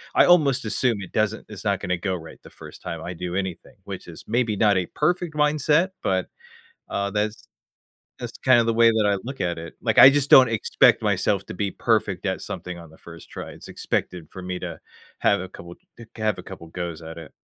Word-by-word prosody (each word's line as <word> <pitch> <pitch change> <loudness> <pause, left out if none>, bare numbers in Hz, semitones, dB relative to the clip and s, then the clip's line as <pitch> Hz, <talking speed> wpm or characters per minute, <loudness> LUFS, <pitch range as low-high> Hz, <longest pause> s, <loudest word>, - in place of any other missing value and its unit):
I - - +6
almost 145 -9 +4
assume 115 +1 +2
it 95 - -10
doesn't 110 0 0
it's 105 -3 -8
not 100 -2 +1
gonna 90 +1 -1
go 95 +1 -2
right 80 -2 -10
the - - -13
1st - - -12
time 85 -1 -5
I 90 - -5
do 90 +1 -5
anything, 95 -3 -4
which - - -7
is - - -10
maybe 115 -1 0
not 105 -2 +4
a 90 -2 -1
perfect 175 +1 0
mindset, 150 +4 +2
but, 95 -1 0 0.7
uh, 100 0 -1
that's 105 +1 -2 0.7
that's - - -7
kind 130 -2 +6
of 115 - -1
the 115 - +2
way 115 0 +5
that 110 -2 +1
I 100 - +1
look 135 +1 -6
at 85 -1 -1
it. 85 -1 -9
Like, - - 0
I 135 - +11
just 145 0 +1
don't 130 -1 +9
expect 115 -2 +3
myself - - +1
to - - -6
be 100 +1 -2
perfect - - 0
at - - -1
something 90 -1 -6
on 85 - -12
the 80 - -17
1st 85 -1 -13
try, - - -7
it's - - -12
expected 90 -4 -3
for 95 - -9
me 90 0 -4
to - - -6 0.4
have 100 - +2
a 95 - -7
couple 85 -1 -11 0.2
c 120 - -11
to 110 - -9
have 110 -2 +1
a - - -8
couple 85 - -10
goes 85 -1 -6
at 80 +1 -9
it. 80 - -11
100 Hz, 230 wpm, -24 LUFS, 90-120 Hz, 0.7 s, I